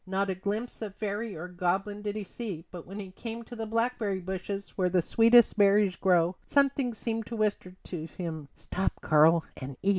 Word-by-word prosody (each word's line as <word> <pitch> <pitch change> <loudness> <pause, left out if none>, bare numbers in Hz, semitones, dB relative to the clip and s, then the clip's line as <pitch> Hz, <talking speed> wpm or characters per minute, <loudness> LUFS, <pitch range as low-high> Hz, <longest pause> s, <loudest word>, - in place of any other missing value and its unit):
Not 195 +1 0
a - - -2
glimpse 205 +7 -3
of 205 -3 -5
fairy 210 +1 -3
or 170 +3 -6
goblin 185 +3 -1
did 205 0 -3
he 215 - -3
see, 195 -5 -6
but 175 -3 -9
when 195 +3 -7
he 190 -2 -7
came 230 +4 -6
to 240 - -10
the 225 -1 -4
blackberry 230 -3 0
bushes 190 +2 -4
where 185 -2 0
the 180 0 +3
sweetest 230 +6 +5
berries 200 -2 +5
grow 180 -1 +3
something 275 -4 +2
seemed 225 0 -3
to 235 - -5
whisper 205 -4 -1
to 165 -3 -6
him: 160 -4 -6
"Stop, 190 - -2
Karl, 160 +1 +5
and 135 -1 -7
eat." 195 - +2
200 Hz, 200 wpm, -29 LUFS, 180-225 Hz, -, sweetest